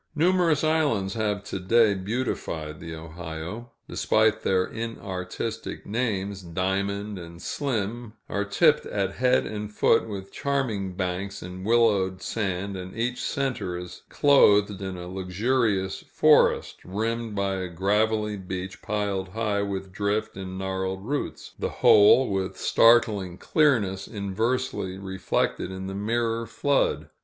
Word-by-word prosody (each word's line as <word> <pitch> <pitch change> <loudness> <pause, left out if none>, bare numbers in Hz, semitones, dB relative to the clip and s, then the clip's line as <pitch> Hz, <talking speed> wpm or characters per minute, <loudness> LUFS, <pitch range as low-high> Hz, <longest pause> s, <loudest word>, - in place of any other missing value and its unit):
Numerous 170 -1 +3
islands 145 -12 +1
have 105 -2 -1
to 95 - -5
day 110 +3 +4
beautified 95 -7 -3
the 80 0 -7
Ohio. 80 +7 -7 0.2
Despite 110 0 +2
their 95 -1 +2
inartistic 110 -2 -5
names, 100 -4 -2
Diamond 100 +3 -2
and 85 0 -10
Slim 115 -2 -3
are 100 - -1
tipped 150 +9 +3
at 100 -2 -1
head 125 0 +3
and 105 -1 -5
foot 115 +2 +3
with 100 -2 -6
charming 115 -10 -1
banks 95 +2 -3
and 90 +1 -8
willowed 100 -4 +2
sand, 100 -2 -2
and 95 +2 -7
each 125 +2 -1
center 130 -10 -2
is 90 0 -8
clothed 105 -9 +4
in 95 -1 -4
a 90 0 -7
luxurious 95 +2 0
forest, - - +3
rimmed 110 +3 -2
by 100 -1 0
a 95 -1 -3
gravelly 105 +4 +1
beach 95 0 -6
piled 100 -2 -2
high 105 0 -1
with 95 -1 -4
drift 100 +2 -1
and 95 -1 -6
gnarled 95 0 -3
roots: 145 +4 -4
the - - -1
whole, 110 +5 +6
with 95 -1 -2
startling 105 -6 +4
clearness, 105 - +2
inversely 105 -1 -2
reflected 95 -1 -1
in 95 0 -6
the 95 - -5
mirrored 115 +2 -1
flood. 140 +4 0
100 Hz, 130 wpm, -26 LUFS, 95-115 Hz, 0.2 s, whole